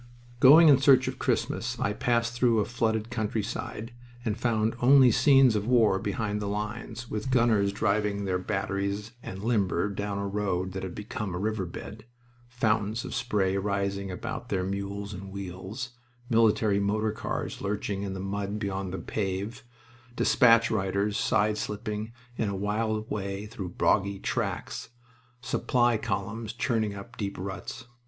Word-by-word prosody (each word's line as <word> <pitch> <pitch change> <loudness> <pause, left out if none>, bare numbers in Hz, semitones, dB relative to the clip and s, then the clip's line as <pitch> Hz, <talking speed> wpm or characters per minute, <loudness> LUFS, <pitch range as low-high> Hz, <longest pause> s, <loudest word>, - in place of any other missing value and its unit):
Going 155 +7 +9
in 140 -3 +7
search 130 -1 +5
of 130 0 -4
Christmas, - - -1
I 100 - 0
passed 115 +1 +1
through 120 -1 +3
a 105 - +2
flooded 115 -1 -1
countryside 110 0 -3 0.3
and 110 -3 0
found 110 -1 +1
only 130 0 +7
scenes 135 -1 +5
of 105 +1 -1
war 115 -6 +4
behind 105 +1 -2
the 105 - -2
lines, 110 +3 -4
with 110 +4 -3
gunners 115 -5 +3
driving 100 0 0
their 90 -1 0
batteries 100 +3 -2
and 95 -2 -7
limber 105 -5 +1
down 100 0 -3
a 100 0 -2
road 95 -2 -1
that 95 0 -5
had 95 -2 -6
become 105 -2 -4
a - - -2
river 105 -1 -1
bed, 105 +5 -9 0.4
fountains 110 -2 0
of - - -6
spray 100 -6 0
rising 100 0 -1
about 90 - -5
their 95 -2 0
mules 100 +1 -4
and 95 +1 -8
wheels, 100 +5 -6 0.4
military 110 -2 +4
motor 105 +2 +1
cars 105 - -4
lurching 100 0 -2
in 100 -1 -3
the - - -5
mud 100 +1 -3
beyond 95 -2 -3
the 95 - -3
pave, 95 +4 -3 0.5
despatch 115 -2 +5
riders 100 0 0
side 105 +2 +2
slipping 105 +1 -4 0.3
in 110 - 0
a 100 - -3
wild 110 +2 -1
way 100 0 -3
through 100 -3 -6
boggy 100 +2 +1
tracks, - - -3 0.5
supply 120 0 +2
columns 110 0 -3
churning 115 -4 0
up 115 +4 -10
deep 100 -2 -3
ruts. 100 +7 -6
105 Hz, 155 wpm, -28 LUFS, 100-115 Hz, 0.5 s, Going